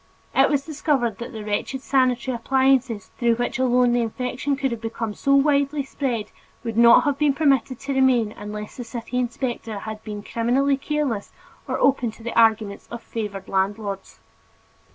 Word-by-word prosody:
It -, -, +5 dB
was 280 Hz, -2 st, 0 dB
discovered 275 Hz, -8 st, 0 dB
that 235 Hz, +2 st, -6 dB
the 220 Hz, -3 st, -7 dB
wretched 210 Hz, +5 st, -2 dB
sanitary 255 Hz, -1 st, +1 dB
appliances 260 Hz, -2 st, +1 dB
through 235 Hz, -1 st, +3 dB
which 245 Hz, +2 st, -2 dB
alone 250 Hz, -1 st, +3 dB
the 245 Hz, -, +2 dB
infection 250 Hz, +4 st, -2 dB
could 270 Hz, -1 st, -1 dB
have 230 Hz, -1 st, -4 dB
become 225 Hz, -1 st, -4 dB
so 275 Hz, +6 st, +2 dB
widely 280 Hz, 0 st, +2 dB
spread, 255 Hz, -5 st, -3 dB, 0.3 s
would 230 Hz, -2 st, -4 dB
not 235 Hz, +1 st, +7 dB
have 285 Hz, -1 st, 0 dB
been 295 Hz, -2 st, +3 dB
permitted 270 Hz, -4 st, +2 dB
to 280 Hz, -, -3 dB
remain, 255 Hz, -5 st, +3 dB
unless 210 Hz, 0 st, -8 dB
the 245 Hz, -, -4 dB
city 235 Hz, +1 st, -4 dB
inspector 240 Hz, -3 st, -3 dB
had 215 Hz, +2 st, -6 dB
either -, -, -29 dB
been 210 Hz, -1 st, -6 dB
criminally 260 Hz, +6 st, +1 dB
careless 275 Hz, -7 st, -2 dB, 0.4 s
or -, -, -1 dB
open 260 Hz, -3 st, +2 dB
to 225 Hz, -, -15 dB
the 235 Hz, -, -4 dB
arguments 220 Hz, -3 st, +2 dB
of 235 Hz, -1 st, -7 dB
favored 205 Hz, -4 st, -5 dB
landlords. 195 Hz, 0 st, -2 dB
240 Hz, 175 wpm, -23 LUFS, 220-270 Hz, 0.4 s, not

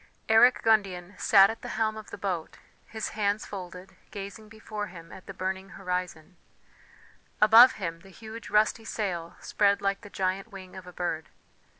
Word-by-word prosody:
Eric 225 Hz, +3 st, +5 dB
Gundian 200 Hz, -4 st, +1 dB
sat 195 Hz, 0 st, +6 dB
at 225 Hz, -, -10 dB
the -, -, -7 dB
helm 220 Hz, -1 st, +1 dB
of 215 Hz, -1 st, -10 dB
the -, -, -8 dB
boat, 180 Hz, -5 st, -4 dB, 0.3 s
his 220 Hz, 0 st, -4 dB
hands 205 Hz, 0 st, -1 dB
folded, 185 Hz, -1 st, -9 dB, 0.2 s
gazing 205 Hz, +2 st, -8 dB
before 215 Hz, -1 st, -6 dB
him 165 Hz, -2 st, -12 dB
at 185 Hz, -, -12 dB
the -, -, -6 dB
burning 190 Hz, 0 st, -4 dB
horizon; 180 Hz, -2 st, -4 dB, 1.0 s
above 225 Hz, +4 st, +8 dB
him 165 Hz, -5 st, -5 dB
the 195 Hz, +3 st, -17 dB
huge 220 Hz, +3 st, -10 dB
rusty 215 Hz, +2 st, +2 dB
sail 180 Hz, -7 st, -4 dB
spread 200 Hz, -1 st, +2 dB
like 195 Hz, 0 st, -1 dB
the 205 Hz, -, -12 dB
giant 190 Hz, +1 st, -2 dB
wing 190 Hz, -2 st, -11 dB
of 185 Hz, -1 st, -10 dB
a -, -, -9 dB
bird. 170 Hz, -3 st, -4 dB
195 Hz, 170 wpm, -28 LUFS, 180-215 Hz, 1.0 s, above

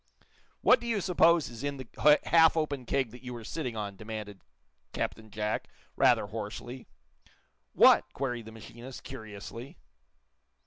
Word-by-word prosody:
"What -, -, +6 dB
do 240 Hz, -, -7 dB
you 225 Hz, -3 st, +1 dB
suppose 170 Hz, -3 st, +3 dB
is 120 Hz, +1 st, -9 dB
in 145 Hz, -1 st, -2 dB
the 150 Hz, +4 st, +3 dB
half 165 Hz, -1 st, +5 dB
open 145 Hz, -6 st, -2 dB
keg 135 Hz, -5 st, 0 dB
that 125 Hz, -, -12 dB
you 125 Hz, -1 st, -7 dB
were 115 Hz, -, -8 dB
sitting 125 Hz, -2 st, -4 dB
on?" 100 Hz, -2 st, -4 dB
demanded 105 Hz, -2 st, -7 dB, 0.5 s
Captain 110 Hz, 0 st, -4 dB
Jack, 105 Hz, 0 st, -2 dB, 0.3 s
rather -, -, +4 dB
hoarsely. 115 Hz, +4 st, -7 dB, 0.9 s
"What!" -, -, +6 dB
queried 125 Hz, -4 st, -3 dB
the -, -, -9 dB
machinist, 120 Hz, +3 st, -11 dB
curiously. 110 Hz, +4 st, -9 dB
120 Hz, 140 wpm, -29 LUFS, 110-145 Hz, 0.9 s, What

